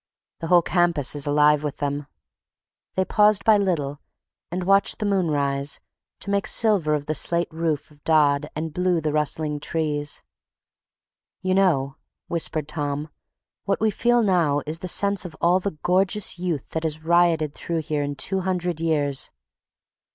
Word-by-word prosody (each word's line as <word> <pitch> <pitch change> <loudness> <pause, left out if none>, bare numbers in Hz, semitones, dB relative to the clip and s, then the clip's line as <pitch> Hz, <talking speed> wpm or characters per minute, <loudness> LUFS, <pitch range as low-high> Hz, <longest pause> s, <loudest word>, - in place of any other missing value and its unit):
"The 165 - -5
whole 175 0 +5
campus 170 -6 +1
is 145 -1 -2
alive 150 0 +4
with 150 -2 -4
them." 145 0 -3 0.9
They 190 - +1
paused 210 0 +3
by 215 -2 +6
Little 150 -7 -1 0.5
and 180 +1 -3
watched 195 +2 +3
the 210 - -3
moon 195 -4 +1
rise, 140 -1 0 0.4
to 200 - -4
make 200 -1 0
silver 195 -9 +2
of 145 -1 -4
the 155 - -1
slate 170 +4 0
roof 160 -2 -2
of 145 -1 -22
Dodd 150 -2 +3
and 155 0 -4
blue 180 0 +1
the 155 -1 -2
rustling 150 0 -1
trees. 150 -2 -3 1.2
"You 185 0 +1
know," 145 -8 +1 0.3
whispered 160 -3 0
Tom, 145 -1 -3 0.6
"what 195 - 0
we 220 0 +2
feel 240 +3 +2
now 165 -8 +2
is 155 +2 -3
the 185 - -6
sense 200 +1 +2
of 175 -4 -9
all 175 +2 +3
the 190 -4 -4
gorgeous 190 +1 +1
youth 170 -7 -3
that 160 - -2
has 155 -1 -3
rioted 165 -3 +3
through 165 +1 -3
here 150 -1 -2
in 145 0 -3
two 190 +8 0
hundred 180 -3 -2
years." 145 -4 0
160 Hz, 165 wpm, -23 LUFS, 150-185 Hz, 1.2 s, by